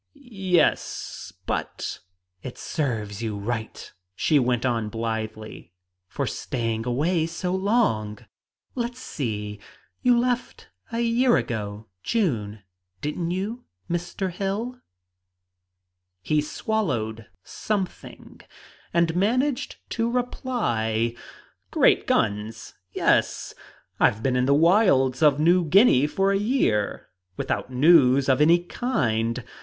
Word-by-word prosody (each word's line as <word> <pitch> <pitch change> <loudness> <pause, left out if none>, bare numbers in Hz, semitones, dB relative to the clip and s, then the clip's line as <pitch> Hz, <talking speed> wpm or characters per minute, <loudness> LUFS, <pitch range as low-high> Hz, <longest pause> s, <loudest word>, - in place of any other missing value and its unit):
"Yes, 190 - -1
but - - -3 0.2
" 90 0 -52
"It 125 - -8
serves 110 - -3
you 110 -3 -3
right," 110 +2 -5 0.2
she 150 - +3
went 125 -1 +1
on 115 -4 0
blithely, 110 -4 -5 0.3
"for - - -3
staying 115 -2 -3
away 160 +7 +1
so 180 +2 -3
long. 190 - +1 0.6
Let's 240 0 -3
see 105 - -4 0.4
you 245 -1 +4
left 245 0 -2 0.2
a 230 0 -1
year 235 +1 +3
ago 105 -2 -4 0.2
June, 110 - -1 0.4
didn't 160 - -3
you, 205 +7 -3 0.3
Mr. 175 +2 -2
Hill?" 205 +7 -3 1.4
He 155 -1 +2
swallowed 130 - -2 0.2
something 200 -4 -5 0.5
and 170 -1 +2
managed 245 +8 0 0.2
to 230 0 0
reply, 120 - -1 0.6
"Great - - +3
guns, 105 +2 -1 0.2
yes! - - +1 0.5
I've 110 +2 +3
been 130 -2 +1
in 125 0 +2
the 140 - +5
wilds 160 - +4
of 150 -2 +5
New 175 +3 +4
Guinea 160 - +5
for 195 +5 +1
a 195 - +2
year 205 - 0 0.3
without - - -2
news 135 -1 +5
of 130 +1 +3
any 170 +3 +5
kind! 120 - -1
150 Hz, 110 wpm, -25 LUFS, -, 1.4 s, the